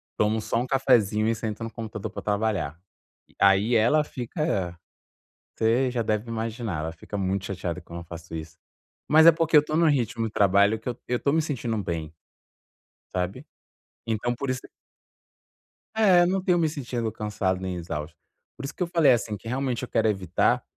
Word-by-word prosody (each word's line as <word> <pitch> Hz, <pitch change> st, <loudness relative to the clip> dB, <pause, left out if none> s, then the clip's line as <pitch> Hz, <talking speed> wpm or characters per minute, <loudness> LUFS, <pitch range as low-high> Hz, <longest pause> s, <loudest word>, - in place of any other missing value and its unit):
tomo 110 Hz, +1 st, +1 dB
só 110 Hz, -, -2 dB
um 125 Hz, -, -3 dB
cafezinho 110 Hz, -6 st, +3 dB
e 115 Hz, -, +2 dB
sento 110 Hz, 0 st, -5 dB
no 115 Hz, -, -5 dB
computador 110 Hz, -2 st, -6 dB
pra -, -, -6 dB
trabalhar. 100 Hz, -7 st, -1 dB, 0.6 s
Aí 100 Hz, +4 st, +4 dB
ela 120 Hz, +8 st, +4 dB
fica, 120 Hz, -, -3 dB, 0.8 s
você 120 Hz, +4 st, +2 dB
já 120 Hz, -2 st, -1 dB
deve 110 Hz, +1 st, -1 dB
imaginar, 115 Hz, -6 st, -3 dB
ela 80 Hz, +1 st, -3 dB
fica 90 Hz, +5 st, -8 dB
muito 95 Hz, 0 st, -1 dB
chateada 90 Hz, -2 st, -4 dB
quando 85 Hz, 0 st, -9 dB
eu -, -, -10 dB
faço 85 Hz, 0 st, -9 dB
isso. 80 Hz, 0 st, -7 dB, 0.5 s
Mas 160 Hz, +2 st, +7 dB
é 170 Hz, -, +10 dB
porque 160 Hz, -1 st, +2 dB
eu -, -, +10 dB
estou 155 Hz, +1 st, -2 dB
num 165 Hz, -1 st, +4 dB
ritmo 120 Hz, -5 st, 0 dB
de 110 Hz, -, -6 dB
trabalho 100 Hz, +2 st, +4 dB
que 110 Hz, -, -7 dB
eu 120 Hz, -, -3 dB
eu 125 Hz, -, +1 dB
estou 140 Hz, -, +1 dB
me 160 Hz, 0 st, +3 dB
sentindo 120 Hz, -7 st, -2 dB
bem. 80 Hz, -5 st, -4 dB, 1.0 s
Sabe? 95 Hz, +9 st, -3 dB, 0.6 s
Então 115 Hz, +2 st, -1 dB
por 135 Hz, +2 st, -3 dB
isso 130 Hz, -1 st, -2 dB, 1.4 s
É 190 Hz, -5 st, +6 dB
eu 175 Hz, -, +4 dB
não 190 Hz, +1 st, 0 dB
tenho 180 Hz, -1 st, +2 dB
me 160 Hz, -, +2 dB
sentido 120 Hz, -6 st, -3 dB
cansado 100 Hz, -4 st, -2 dB
nem 95 Hz, -1 st, -3 dB
exausto, 80 Hz, -2 st, -5 dB, 0.4 s
por -, -, -8 dB
isso -, -, -6 dB
que -, -, -1 dB
eu 175 Hz, -, -2 dB
falei 165 Hz, -6 st, +4 dB
assim 115 Hz, -3 st, +1 dB
que 110 Hz, -, -12 dB
realmente 130 Hz, 0 st, -2 dB
eu 125 Hz, -, -3 dB
quero 110 Hz, -1 st, +2 dB
evitar, 95 Hz, -5 st, +1 dB
110 Hz, 190 wpm, -26 LUFS, 95-130 Hz, 1.4 s, é